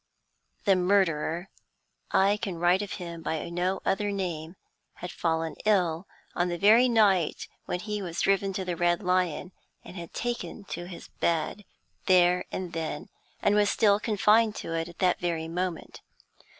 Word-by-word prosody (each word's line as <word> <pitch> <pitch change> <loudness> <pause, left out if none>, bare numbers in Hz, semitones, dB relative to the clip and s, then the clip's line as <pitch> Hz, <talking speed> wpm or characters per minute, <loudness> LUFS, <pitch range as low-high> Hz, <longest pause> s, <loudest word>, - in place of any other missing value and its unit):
The 195 -2 +5
murderer 180 -2 +1 0.6
I 200 +2 +3
can 195 -5 -4
write 175 +3 +3
of 205 -2 -5
him 170 -2 -7
by 160 -1 -3
no 180 +2 -1
other 205 +1 0
name 175 -4 -4 0.4
had 180 - -7
fallen 160 -1 -1
ill 180 -4 +1 0.3
on 175 0 0
the 175 - -2
very 225 +7 +6
night 200 -8 +2 0.2
when 180 - -3
he 210 0 -3
was 170 -3 -5
driven 195 0 +2
to 190 0 -3
the 180 -1 -2
Red 175 +3 +1
Lion, 180 -1 0 0.3
had 170 -2 -9
taken 240 -3 -4
to 175 - -5
his 175 -2 -10
bed 170 +5 -1 0.4
there 180 -1 +4
and 180 -2 -5
then, 160 -2 -4 0.3
and 205 - +4
was 205 -1 +3
still 205 -2 +3
confined 215 0 +3
to 165 - -5
it 165 +1 -2
at 175 - -14
that 180 -2 +2
very 165 -2 -2
moment. 175 0 -4
180 Hz, 160 wpm, -27 LUFS, 170-200 Hz, 0.6 s, very